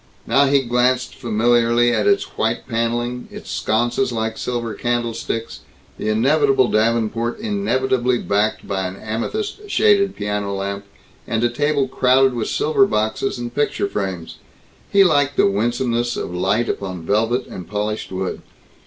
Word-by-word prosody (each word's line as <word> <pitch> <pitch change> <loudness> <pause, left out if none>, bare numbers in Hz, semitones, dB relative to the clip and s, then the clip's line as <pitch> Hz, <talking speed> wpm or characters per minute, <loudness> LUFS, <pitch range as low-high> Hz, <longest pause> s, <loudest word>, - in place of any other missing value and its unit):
Now 140 +1 +4
he 140 0 +3
glanced 125 +1 +1
familiarly 120 +1 +2
at - - +1
its 400 0 +3
white - - -1
paneling, 120 +1 -2
its - - -9
sconces 120 +4 0
like 110 -1 -2
silver 120 -2 -3
candlesticks, 115 0 -3 0.4
the 110 - -2
inevitable 135 +3 +3
davenport 115 +1 0
inevitably 130 - 0
backed 105 0 -1
by 95 -1 -1
an 90 - -7
amethyst 405 - -4
shaded 200 - +3
piano 105 -1 -2
lamp 100 +1 -4 0.4
and 115 0 -1
a 120 - +3
table 145 +2 0
crowded 130 0 +3
with 120 -2 -2
silver 175 +6 +2
boxes 110 - -1
and 120 0 -5
picture 145 +9 0
frames. 90 - -4 0.5
He 200 0 +6
liked 145 -5 +2
the - - +5
winsomeness 120 +3 0
of - - -4
light 100 +6 +1
upon 95 -4 -4
velvet 115 +6 +1
and 90 -3 -9
polished 105 +2 -3
wood. 95 0 -3
120 Hz, 145 wpm, -20 LUFS, 105-130 Hz, 0.5 s, He